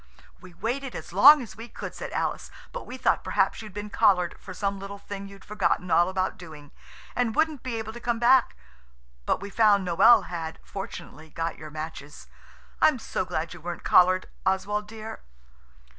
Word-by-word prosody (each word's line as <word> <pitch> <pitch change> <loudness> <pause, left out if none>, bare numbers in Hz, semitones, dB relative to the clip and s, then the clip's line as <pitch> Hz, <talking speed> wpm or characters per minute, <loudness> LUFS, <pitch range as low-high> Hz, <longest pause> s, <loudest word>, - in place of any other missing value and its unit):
"We 180 -1 -15
waited 245 +7 -3
as - - -8
long 295 0 +8
as 225 - -11
we 230 +2 -9
could," - - -7
said - - -7
Alice, - - -2 0.2
"but - - -7
we 255 - -7
thought 260 - +1
perhaps 195 +1 +1
you'd 215 -1 -9
been 205 0 -6
collared 180 -4 +3
for 190 - -10
some 200 +1 -2
little 200 +1 -7
thing 200 0 -8
you'd 195 0 -14
forgotten 195 -3 0
all 175 +1 +4
about 190 0 -2
doing, 155 -5 -12 0.4
and 245 -3 0
wouldn't 310 -4 +1
be 255 -2 -4
able 220 -1 -5
to 240 - -8
come 235 -1 -1
back, 245 +2 +4 0.7
but - - +1
we 200 0 -7
found 205 -4 +4
Noël 195 +4 +6
had, 165 -2 -5
fortunately, 160 -5 -8
got 165 +1 -4
your 155 0 -8
matches. 155 -1 -8 0.6
I'm 305 -4 +5
so 205 -4 -3
glad 170 -2 -3
you 175 - -12
weren't 175 +1 -6
collared, 185 +1 +5 0.2
Oswald 200 +2 0
dear." 220 0 -8
200 Hz, 185 wpm, -26 LUFS, 175-225 Hz, 0.7 s, long